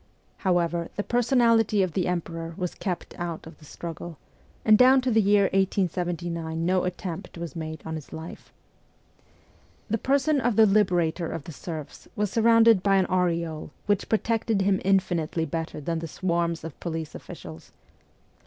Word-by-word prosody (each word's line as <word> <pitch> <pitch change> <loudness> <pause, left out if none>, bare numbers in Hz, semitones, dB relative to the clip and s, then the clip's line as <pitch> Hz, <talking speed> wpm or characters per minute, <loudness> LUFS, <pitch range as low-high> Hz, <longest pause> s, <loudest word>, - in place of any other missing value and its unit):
However, 170 -2 0
the 205 - -2
personality 230 -4 +3
of 180 -4 -2
the 185 - 0
Emperor 165 -1 -3
was 180 -1 -3
kept 185 -4 -4
out 170 -2 -4
of 160 - -12
the 155 - -15
struggle, 165 +1 -7 0.5
and 215 - +7
down 255 +3 +6
to 255 0 0
the 220 0 +4
year 205 0 +4
1879 175 -3 -1
no 185 +1 +2
attempt 180 -2 -5
was 170 -4 -6
made 160 -2 -6
on 160 - -4
his 155 -3 -7
life. 160 +2 -9 1.4
The 225 - +1
person 280 +3 +2
of 240 -2 +1
the 220 - +7
Liberator 180 -5 +2
of 165 - -5
the 165 - -8
serfs 155 -2 -8
was 205 -2 -1
surrounded 230 -2 +5
by 195 0 +3
an 190 -1 +4
aureole 170 -4 0 0.2
which 205 -1 0
protected 225 -2 +1
him 195 -1 +2
infinitely 175 -4 +1
better 165 -2 -4
than 165 +3 -2
the 165 - -5
swarms 170 -1 -1
of 165 -3 -8
police 160 -2 -4
officials. 80 0 -10
180 Hz, 160 wpm, -26 LUFS, 165-205 Hz, 1.4 s, and